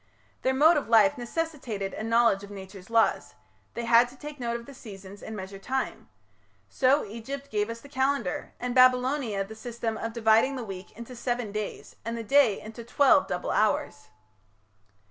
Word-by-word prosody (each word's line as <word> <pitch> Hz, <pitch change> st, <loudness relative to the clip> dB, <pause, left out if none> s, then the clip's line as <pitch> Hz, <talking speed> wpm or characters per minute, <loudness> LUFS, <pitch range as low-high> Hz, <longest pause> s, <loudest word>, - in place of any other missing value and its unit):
Their 260 Hz, 0 st, +1 dB
mode 310 Hz, +5 st, +6 dB
of 285 Hz, -, -3 dB
life 235 Hz, +6 st, +5 dB
necessitated 245 Hz, -, -4 dB
a -, -, -6 dB
knowledge 230 Hz, -3 st, +3 dB
of 200 Hz, -, -10 dB
Nature's 195 Hz, -1 st, -10 dB
laws; 230 Hz, -1 st, +1 dB, 0.4 s
they 235 Hz, -, -3 dB
had 235 Hz, +1 st, +5 dB
to 260 Hz, -, -16 dB
take 295 Hz, 0 st, -9 dB
note 235 Hz, -1 st, -2 dB
of 235 Hz, -, -13 dB
the 280 Hz, -, -11 dB
seasons 200 Hz, -4 st, -11 dB
and 220 Hz, -, -7 dB
measure 195 Hz, 0 st, -7 dB
time. 260 Hz, +6 st, -3 dB, 0.6 s
So 275 Hz, +2 st, +2 dB
Egypt 250 Hz, +7 st, -7 dB
gave 210 Hz, 0 st, 0 dB
us 230 Hz, 0 st, -6 dB
the -, -, -13 dB
Calendar, 265 Hz, -7 st, -1 dB
and 250 Hz, 0 st, -3 dB
Babylonia 255 Hz, -4 st, +3 dB
the 205 Hz, +3 st, -10 dB
system 225 Hz, 0 st, -4 dB
of 225 Hz, -, -3 dB
dividing 225 Hz, +3 st, +3 dB
the 255 Hz, -, -4 dB
week 190 Hz, -2 st, -8 dB
into 235 Hz, +2 st, -9 dB
seven 240 Hz, -2 st, -2 dB
days, 210 Hz, 0 st, -6 dB
and 230 Hz, +1 st, -4 dB
the 230 Hz, -, -4 dB
day 250 Hz, -3 st, +4 dB
into 225 Hz, +2 st, -9 dB
twelve 280 Hz, +5 st, +4 dB
double 180 Hz, -, -3 dB
hours. 200 Hz, -, 0 dB
235 Hz, 180 wpm, -27 LUFS, 210-260 Hz, 0.6 s, mode